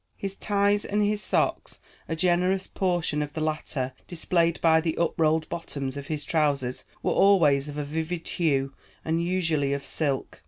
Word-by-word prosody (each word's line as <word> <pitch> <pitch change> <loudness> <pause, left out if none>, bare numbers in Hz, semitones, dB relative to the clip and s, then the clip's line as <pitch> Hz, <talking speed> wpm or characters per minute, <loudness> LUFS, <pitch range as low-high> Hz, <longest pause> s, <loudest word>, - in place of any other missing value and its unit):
His 195 -1 -4
ties 205 0 +1
and 210 +1 0
his 210 0 +1
socks, - - -1 0.3
a 165 - -1
generous 180 +3 +2
portion 175 -5 0
of 150 0 -4
the 160 - -4
latter 155 -4 -2
displayed 170 -1 +1
by 160 -1 +4
the 160 -1 -2
up 170 - +1
rolled 160 0 +2
bottoms 140 -5 -4
of 140 -1 -6
his 150 -2 -2
trousers, 140 -5 0 0.2
were - - +1
always 150 -8 +4
of 145 - -7
a 150 - -1
vivid 160 +3 -4
hue 140 -5 0 0.3
and 165 +1 0
usually 165 -6 0
of 140 0 -4
silk. 140 -4 -2
160 Hz, 170 wpm, -26 LUFS, 145-180 Hz, 0.3 s, by